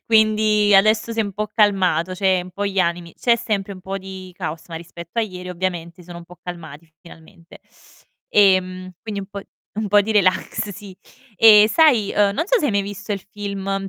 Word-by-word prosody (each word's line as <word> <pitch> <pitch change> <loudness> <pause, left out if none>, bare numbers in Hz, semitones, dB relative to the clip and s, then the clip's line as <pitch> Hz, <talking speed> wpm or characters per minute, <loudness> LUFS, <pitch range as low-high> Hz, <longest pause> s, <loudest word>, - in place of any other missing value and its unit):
quindi 215 -2 +3
adesso 215 +3 +3
si 225 - -1
è - - +3
un 200 -2 -5
po' 215 +2 -3
calmato, 185 -5 +2
cioè 190 -1 +1
un 180 - -11
po' 200 +3 -3
gli 195 -1 -3
animi, 170 -1 -2
c'è 235 -1 +2
sempre 210 -4 -3
un 185 - -11
po' 190 +2 -5
di 190 -1 -10
caos, 165 -3 -6
ma 165 - -8
rispetto 170 +4 -9
a - - +3
ieri 180 -4 -7
ovviamente 180 -1 -4
sono 175 0 -10
un 170 - -12
po' 180 0 -16
calmati 165 -2 -9
finalmente. 170 +1 -16 0.7
Ehm, 185 -2 +2
quindi 210 -3 -5
un 195 - -8
po' 200 0 -8 0.4
un 215 -1 -2
po' 205 +1 +5
di 215 +2 -2
relax, 200 +1 +1
sì. 195 -1 -11 0.4
E, 215 0 +7
sai, 245 -7 +3
uhm, 205 -1 +3
non 320 - -2
so - - +3
se - - +1
hai - - 0
mai 200 -1 +1
visto 205 +1 -8
il 200 - -3
film, 195 -1 -4
195 Hz, 205 wpm, -20 LUFS, 180-210 Hz, 0.7 s, E